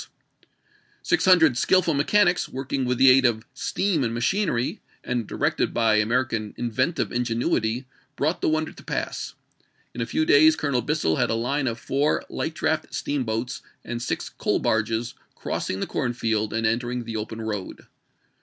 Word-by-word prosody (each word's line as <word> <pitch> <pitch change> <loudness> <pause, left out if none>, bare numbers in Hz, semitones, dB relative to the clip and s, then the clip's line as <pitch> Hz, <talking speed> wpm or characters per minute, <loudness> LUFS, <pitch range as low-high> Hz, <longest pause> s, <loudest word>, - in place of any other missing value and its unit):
Six 345 +1 +1
hundred 160 -9 +5
skillful 185 -3 +3
mechanics 175 +5 +2
working 135 0 -3
with 125 0 0
the 130 +1 +7
aid 135 +1 +5
of 115 -3 +1
steam 165 +3 0
and 115 -1 -1
machinery, 125 - 0 0.2
and 120 -4 -2
directed - - -1
by 110 -2 +3
American 110 -1 0
inventive 130 +7 -1
ingenuity, 120 0 0 0.3
brought 155 +5 -1
the - - +2
wonder 155 0 0
to - - -14
pass. - - -4 0.6
In 120 - -5
a 115 - -2
few 155 - 0
days 155 +2 +6
Colonel 140 -6 0
Bissell 120 - 0
had - - +1
a - - +1
line 130 +4 -1
of 115 -1 -2
four 140 +4 0
light 160 0 -3
draft 155 -1 -1
steamboats 125 0 -2 0.2
and 120 0 -5
six 120 - -3
coal - - -1
barges 110 +2 0
^ - - -33 0.2
crossing 95 - -3
the - - 0
corn 125 -4 -2
field 110 -3 -1
and 115 +1 -1
entering 120 +2 -1
the 115 -1 -6
open 110 +1 -5
road. 105 -4 -5
125 Hz, 165 wpm, -24 LUFS, 115-150 Hz, 0.6 s, the